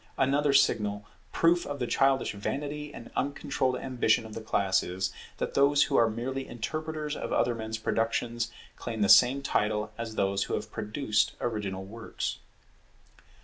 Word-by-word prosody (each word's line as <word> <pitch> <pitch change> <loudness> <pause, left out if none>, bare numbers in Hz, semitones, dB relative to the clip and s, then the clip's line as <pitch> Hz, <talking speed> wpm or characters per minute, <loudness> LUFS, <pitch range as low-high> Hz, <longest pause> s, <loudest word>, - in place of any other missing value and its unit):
Another 140 +2 +3
signal 105 -7 +2 0.3
proof 170 +1 +3
of 145 - -5
the 125 - -1
childish 135 +2 +2
vanity 145 +8 -4
and 115 - -10
uncontrolled 140 -2 -1
ambition 120 -4 +1
of 110 - -9
the 115 - -5
class 100 -3 +2
is, 90 +2 -3 0.2
that - - -3
those 140 +1 +5
who 140 - -1
are 115 -3 +5
merely 130 +4 -4
interpreters 155 +5 -4
of - - -5
other 120 - +2
men's 110 -1 -4
productions 115 +1 -1 0.3
claim 115 -3 -4
the 100 - +3
same 130 +3 +7
title 105 -3 0
as 115 -1 -5
those 100 0 +1
who - - -2
have 105 0 -5
produced 110 +1 0
original 100 -5 -3
works. 115 +3 -5
120 Hz, 155 wpm, -29 LUFS, 110-140 Hz, 0.3 s, same